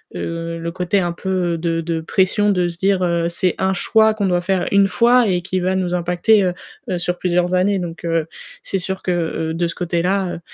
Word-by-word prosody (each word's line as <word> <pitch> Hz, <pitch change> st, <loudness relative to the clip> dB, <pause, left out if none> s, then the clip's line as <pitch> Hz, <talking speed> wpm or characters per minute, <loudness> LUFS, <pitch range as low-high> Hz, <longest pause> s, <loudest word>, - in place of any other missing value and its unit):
heu, 165 Hz, 0 st, -4 dB
le 170 Hz, 0 st, -4 dB
côté 180 Hz, +2 st, 0 dB
un 175 Hz, -2 st, -1 dB
peu 180 Hz, -2 st, -1 dB
de 165 Hz, 0 st, -1 dB
de 165 Hz, 0 st, -2 dB
pression 190 Hz, +5 st, +1 dB
de 180 Hz, -3 st, +2 dB
se 170 Hz, -, -5 dB
dire: 190 Hz, 0 st, +1 dB
«Heu, 170 Hz, -1 st, 0 dB
c'est 175 Hz, +1 st, 0 dB
1 190 Hz, 0 st, +1 dB
choix 220 Hz, +4 st, +3 dB
qu'on 210 Hz, -2 st, -2 dB
doit 175 Hz, -1 st, +1 dB
faire 185 Hz, 0 st, 0 dB
1 200 Hz, 0 st, +5 dB
fois 235 Hz, +4 st, +4 dB
et 180 Hz, -1 st, +1 dB
qui 185 Hz, +1 st, -2 dB
va 185 Hz, +1 st, 0 dB
nous 180 Hz, -1 st, -1 dB
impacter, 180 Hz, +4 st, +2 dB
heu, 180 Hz, 0 st, -5 dB
sur 180 Hz, 0 st, -2 dB
plusieurs 180 Hz, 0 st, 0 dB
années». 190 Hz, +2 st, +2 dB
Donc 175 Hz, -1 st, -6 dB
heu, 165 Hz, -2 st, 0 dB, 0.3 s
c'est 195 Hz, -, -2 dB
sûr 190 Hz, +1 st, -4 dB
que, 185 Hz, -, -2 dB
heu 170 Hz, -2 st, 0 dB, 0.2 s
heu, -, -, -3 dB
de 170 Hz, +1 st, 0 dB
ce 165 Hz, -, -6 dB
côté-là 180 Hz, +3 st, 0 dB
heu, -, -, -6 dB
180 Hz, 230 wpm, -19 LUFS, 170-190 Hz, 0.3 s, 1